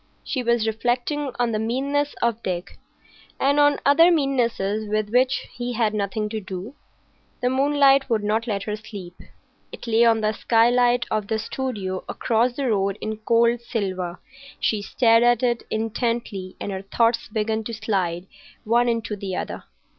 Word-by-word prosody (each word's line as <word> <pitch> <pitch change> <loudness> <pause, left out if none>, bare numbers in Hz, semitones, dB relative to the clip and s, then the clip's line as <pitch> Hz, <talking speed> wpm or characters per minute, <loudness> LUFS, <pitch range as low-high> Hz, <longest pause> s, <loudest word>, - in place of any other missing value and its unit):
She 260 - -2
was 235 -2 +1
reflecting 245 +6 -1
on 240 -1 +1
the 215 - -1
meannesses 280 +6 -1
of 235 -1 0
Dick, 180 -1 -5 0.6
and 285 +2 +3
on 290 0 +5
other 330 +5 +6
meannesses 235 - 0
with 215 0 -1
which 255 +2 +2
he 245 0 -4
had 220 -2 +1
nothing 210 +1 -2
to 220 0 -4
do. 190 +5 -7 0.7
The 250 - +1
moonlight 275 0 +4
would 220 -3 +1
not 220 +3 0
let 200 -3 -2
her 210 0 -3
sleep. 205 -4 -9 0.6
It - - -9
lay 230 0 +3
on 225 -1 +4
the 215 0 +1
skylight 240 +2 +3
of 215 -2 -1
the 220 - 0
studio 215 -5 -4
across 235 +1 +1
the 260 -2 -1
road 195 -1 0
in 215 0 -4
cold 235 +2 +2
silver; 185 -7 -3 0.4
she 215 -2 0
stared 230 +2 +3
at 240 0 +3
it 240 -1 0
intently 220 -4 -2
and 205 - -4
her 190 -1 -4
thoughts 230 +4 +1
began 220 +1 -1
to 230 - -5
slide 190 -5 -2 0.4
one 240 +2 +2
into 230 -2 -2
the 195 -2 -5
other. - - -5
225 Hz, 165 wpm, -23 LUFS, 210-245 Hz, 0.7 s, other